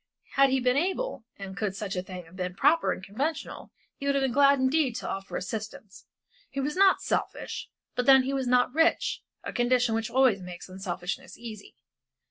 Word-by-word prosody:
Had 275 Hz, 0 st, +5 dB
he 265 Hz, 0 st, +2 dB
been 250 Hz, +1 st, +2 dB
able, 375 Hz, -, -1 dB
and 195 Hz, -1 st, -7 dB
could 200 Hz, -1 st, -2 dB
such 195 Hz, -1 st, -4 dB
a 180 Hz, -, -1 dB
thing 180 Hz, -1 st, -8 dB
have 165 Hz, +3 st, -16 dB
been 180 Hz, -1 st, -4 dB
proper 330 Hz, -, +3 dB
and 185 Hz, -, -5 dB
conventional, 270 Hz, +12 st, -4 dB, 0.3 s
he 280 Hz, -, -5 dB
would 280 Hz, -, +2 dB
have 275 Hz, -, +2 dB
been 265 Hz, -, +1 dB
glad 280 Hz, +2 st, +5 dB
indeed 260 Hz, -1 st, +2 dB
to -, -, -4 dB
offer 195 Hz, 0 st, -4 dB
assistance; 210 Hz, 0 st, -7 dB, 0.4 s
he 275 Hz, -, -5 dB
was 290 Hz, +2 st, -1 dB
not 385 Hz, 0 st, +5 dB
selfish, -, -, -3 dB, 0.2 s
but 250 Hz, -, -2 dB
then 265 Hz, -1 st, +8 dB
he 270 Hz, +2 st, -2 dB
was 265 Hz, -2 st, -1 dB
not 250 Hz, 0 st, +3 dB
rich, 325 Hz, +2 st, +2 dB, 0.2 s
a -, -, -5 dB
condition 245 Hz, -1 st, +2 dB
which 225 Hz, +1 st, -1 dB
always 245 Hz, -5 st, +3 dB
makes 180 Hz, -1 st, -8 dB
unselfishness 190 Hz, +6 st, -5 dB
easy. 220 Hz, -4 st, -10 dB
245 Hz, 195 wpm, -28 LUFS, 195-275 Hz, 0.4 s, then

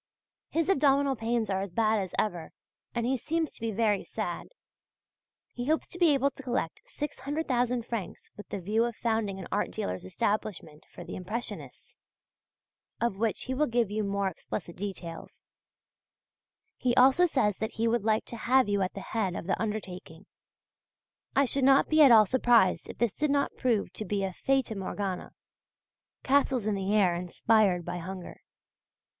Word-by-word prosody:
His 330 Hz, +1 st, 0 dB
abdominal 280 Hz, -5 st, +3 dB
pains 230 Hz, -1 st, -1 dB
are 190 Hz, 0 st, 0 dB
as 195 Hz, -2 st, -5 dB
bad 220 Hz, +2 st, +2 dB
as 190 Hz, -3 st, -4 dB
ever, 175 Hz, -6 st, -2 dB, 0.4 s
and 235 Hz, -1 st, 0 dB
he 260 Hz, +2 st, +1 dB
seems 320 Hz, +5 st, -2 dB
to -, -, -16 dB
be 230 Hz, -, -1 dB
very 210 Hz, -1 st, +1 dB
sad. -, -, -4 dB, 1.1 s
He 245 Hz, +1 st, -5 dB
hopes 315 Hz, +1 st, +1 dB
to 355 Hz, -, -8 dB
be 340 Hz, -3 st, +5 dB
able 275 Hz, +1 st, +2 dB
to -, -, -11 dB
collect 245 Hz, -10 st, -2 dB
600,000 265 Hz, -5 st, -2 dB
francs 230 Hz, -7 st, -6 dB
with 205 Hz, -, -11 dB
the 200 Hz, -, -4 dB
view 210 Hz, +5 st, +1 dB
of 240 Hz, -2 st, -4 dB
founding 220 Hz, -4 st, -1 dB
an 190 Hz, -, -7 dB
art -, -, 0 dB
dealer's 90 Hz, 0 st, -4 dB
establishment 165 Hz, -, -3 dB
for -, -, -11 dB
Impressionists, 210 Hz, +7 st, -6 dB, 1.0 s
of 220 Hz, -5 st, -1 dB
which 225 Hz, -1 st, 0 dB
he 260 Hz, -, -3 dB
will 300 Hz, +3 st, +1 dB
give 235 Hz, -3 st, +1 dB
you 215 Hz, +1 st, -1 dB
more 200 Hz, -1 st, 0 dB
explicit 175 Hz, -2 st, -6 dB
details; 185 Hz, -4 st, -7 dB, 1.3 s
he 245 Hz, -1 st, +1 dB
also 265 Hz, +8 st, +6 dB
says 210 Hz, -, +1 dB
that 220 Hz, -, -3 dB
he 230 Hz, +1 st, 0 dB
would 230 Hz, -2 st, +1 dB
like 220 Hz, 0 st, +1 dB
to 235 Hz, -, -8 dB
have 255 Hz, +2 st, +3 dB
you 200 Hz, -1 st, +1 dB
at 185 Hz, -, -2 dB
the 195 Hz, -, -5 dB
head 195 Hz, -3 st, -2 dB
of -, -, -5 dB
the 185 Hz, -, -1 dB
undertaking. 190 Hz, -5 st, -5 dB, 1.1 s
I 275 Hz, -, +5 dB
should 270 Hz, +1 st, 0 dB
not 270 Hz, +1 st, +5 dB
be 310 Hz, 0 st, +5 dB
at 280 Hz, -4 st, +8 dB
all 220 Hz, -2 st, +8 dB
surprised 235 Hz, -3 st, +3 dB
if -, -, -7 dB
all 235 Hz, -, +2 dB
this 220 Hz, -, -5 dB
did 300 Hz, 0 st, 0 dB
not 280 Hz, 0 st, +1 dB
prove 235 Hz, -6 st, 0 dB
to 215 Hz, -, -5 dB
be 200 Hz, -1 st, -1 dB
a 190 Hz, -1 st, -2 dB
Fata 270 Hz, +2 st, 0 dB
Morgana 195 Hz, -1 st, -4 dB, 0.9 s
castles 265 Hz, -4 st, +2 dB
in 215 Hz, -, +1 dB
the 195 Hz, 0 st, -2 dB
air 200 Hz, -4 st, +4 dB
inspired 180 Hz, +1 st, +2 dB
by 180 Hz, -, -4 dB
hunger. 185 Hz, +1 st, -8 dB
220 Hz, 175 wpm, -29 LUFS, 195-260 Hz, 1.3 s, at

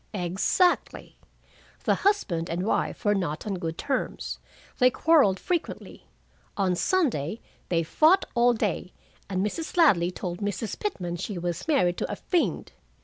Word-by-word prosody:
"Exactly. 195 Hz, -, 0 dB, 0.6 s
'The -, -, +3 dB
husband 195 Hz, -, 0 dB
and 175 Hz, +3 st, -2 dB
wife 220 Hz, -, -1 dB
were 205 Hz, -, +4 dB
not 170 Hz, -6 st, -2 dB
on 195 Hz, -4 st, -3 dB
good 165 Hz, -1 st, -4 dB
terms. 270 Hz, -2 st, -3 dB, 0.4 s
They 250 Hz, -, +6 dB
quarreled 275 Hz, -, +3 dB
frequently. 350 Hz, -3 st, -4 dB, 0.5 s
On 190 Hz, -3 st, +2 dB
Sunday 225 Hz, -, 0 dB, 0.3 s
they 170 Hz, -2 st, +1 dB
fought 315 Hz, -, +4 dB
all 240 Hz, 0 st, +4 dB
day, 205 Hz, -5 st, -2 dB, 0.4 s
and 190 Hz, 0 st, 0 dB
Mrs. 320 Hz, +11 st, -4 dB
Ladley 195 Hz, -, +5 dB
told 180 Hz, -1 st, -5 dB
Mrs. 205 Hz, +1 st, -3 dB
Pitman 180 Hz, -, -3 dB
she 195 Hz, +3 st, -5 dB
was 175 Hz, -, -4 dB
married 180 Hz, -, +2 dB
to -, -, -3 dB
a -, -, -2 dB
fiend. 355 Hz, -3 st, -1 dB
200 Hz, 145 wpm, -26 LUFS, 175-295 Hz, 0.6 s, They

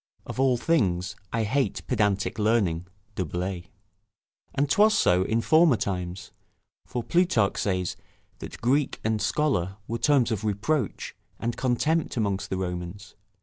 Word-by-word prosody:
["Of -, -, -7 dB
all 130 Hz, -2 st, +3 dB
things 100 Hz, -, +1 dB, 0.2 s
I 115 Hz, -1 st, 0 dB
hate 130 Hz, +6 st, -1 dB
pedantic 105 Hz, -4 st, 0 dB
learning." 100 Hz, -6 st, +1 dB, 0.3 s
Du 95 Hz, -, -2 dB
Bellay] 90 Hz, +2 st, -4 dB, 0.9 s
And 145 Hz, +2 st, +2 dB
'twas 210 Hz, +8 st, +4 dB
so 90 Hz, +1 st, +4 dB
in 110 Hz, +4 st, +1 dB
former 155 Hz, -2 st, +5 dB
times; 90 Hz, -1 st, -4 dB, 0.6 s
for 120 Hz, -, -3 dB
Plutarch 170 Hz, -, +2 dB
says 90 Hz, -3 st, -1 dB, 0.4 s
that -, -, -9 dB
Greek 135 Hz, +4 st, +1 dB
and 110 Hz, -1 st, 0 dB
Scholar 110 Hz, -, 0 dB
were 115 Hz, +1 st, -3 dB
terms 135 Hz, -5 st, +3 dB
of 110 Hz, -1 st, -2 dB
reproach 110 Hz, -, -1 dB, 0.2 s
and 115 Hz, +1 st, -2 dB
contempt 150 Hz, +5 st, 0 dB
amongst 100 Hz, -3 st, -1 dB
the 95 Hz, -, -2 dB
Romans. 90 Hz, +2 st, -5 dB
110 Hz, 140 wpm, -26 LUFS, 95-130 Hz, 0.9 s, former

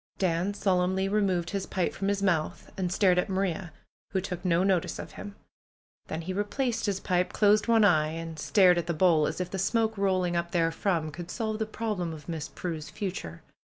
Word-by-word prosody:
Dan 185 Hz, +2 st, 0 dB
solemnly 190 Hz, -1 st, +1 dB
removed 195 Hz, -4 st, +1 dB
his 195 Hz, -2 st, -3 dB
pipe 185 Hz, -2 st, -1 dB
from 195 Hz, -, -3 dB
his 200 Hz, 0 st, 0 dB
mouth 170 Hz, -5 st, 0 dB
and 180 Hz, -2 st, -2 dB
stared 180 Hz, -1 st, +4 dB
at 180 Hz, -, -1 dB
Maria, 190 Hz, -2 st, -1 dB, 0.4 s
who 190 Hz, -, +2 dB
took 180 Hz, -1 st, -5 dB
no 180 Hz, -1 st, +2 dB
notice 190 Hz, -3 st, +1 dB
of -, -, -7 dB
him. 205 Hz, 0 st, -9 dB, 0.7 s
Then 160 Hz, -, -4 dB
he 185 Hz, +3 st, -3 dB
replaced 225 Hz, +4 st, -1 dB
his 195 Hz, -2 st, 0 dB
pipe, 180 Hz, -1 st, 0 dB
closed 210 Hz, +1 st, +3 dB
one 225 Hz, -2 st, +5 dB
eye 155 Hz, -6 st, +4 dB
and 165 Hz, 0 st, -6 dB
stared 180 Hz, -1 st, +5 dB
at 170 Hz, -, -4 dB
the 170 Hz, -, -1 dB
bowl, 160 Hz, -3 st, +4 dB
as -, -, -4 dB
if 180 Hz, 0 st, -3 dB
the 190 Hz, -, -3 dB
smoke 220 Hz, +3 st, +1 dB
rolling 185 Hz, -3 st, +1 dB
up 170 Hz, 0 st, -2 dB
therefrom 165 Hz, -1 st, 0 dB
could 175 Hz, +3 st, -8 dB
solve 220 Hz, +1 st, -3 dB
the 220 Hz, -, -1 dB
problem 210 Hz, -7 st, -3 dB
of 155 Hz, -2 st, -11 dB
Miss 160 Hz, -4 st, -4 dB
Prue's 160 Hz, -4 st, -5 dB
future. 175 Hz, -, -5 dB
185 Hz, 200 wpm, -28 LUFS, 170-200 Hz, 0.7 s, one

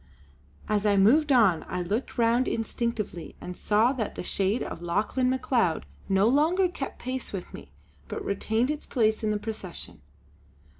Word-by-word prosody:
As 210 Hz, -1 st, +1 dB
I 200 Hz, -1 st, +3 dB
moved 280 Hz, +10 st, +5 dB
on, 215 Hz, -10 st, +4 dB
I 180 Hz, -1 st, -2 dB
looked 210 Hz, +11 st, -3 dB
round 235 Hz, +2 st, +3 dB
instinctively 225 Hz, -5 st, -3 dB
and 180 Hz, -, -7 dB
saw 220 Hz, +7 st, +2 dB
that 235 Hz, -6 st, -3 dB
the -, -, -5 dB
shade 195 Hz, +5 st, 0 dB
of -, -, -6 dB
Lauchlane 210 Hz, +9 st, 0 dB
Macleod 250 Hz, -, +1 dB, 0.2 s
no 195 Hz, +2 st, +4 dB
longer 320 Hz, +9 st, +3 dB
kept 320 Hz, -6 st, -6 dB
pace 255 Hz, 0 st, -4 dB
with 190 Hz, -3 st, -6 dB
me, 70 Hz, -, -10 dB, 0.4 s
but -, -, -5 dB
retained 220 Hz, +6 st, 0 dB
its 300 Hz, -, -5 dB
place 220 Hz, -3 st, +1 dB
in 215 Hz, -, +1 dB
the 210 Hz, -, +1 dB
procession. 185 Hz, -, -7 dB
220 Hz, 160 wpm, -27 LUFS, 195-255 Hz, 0.4 s, moved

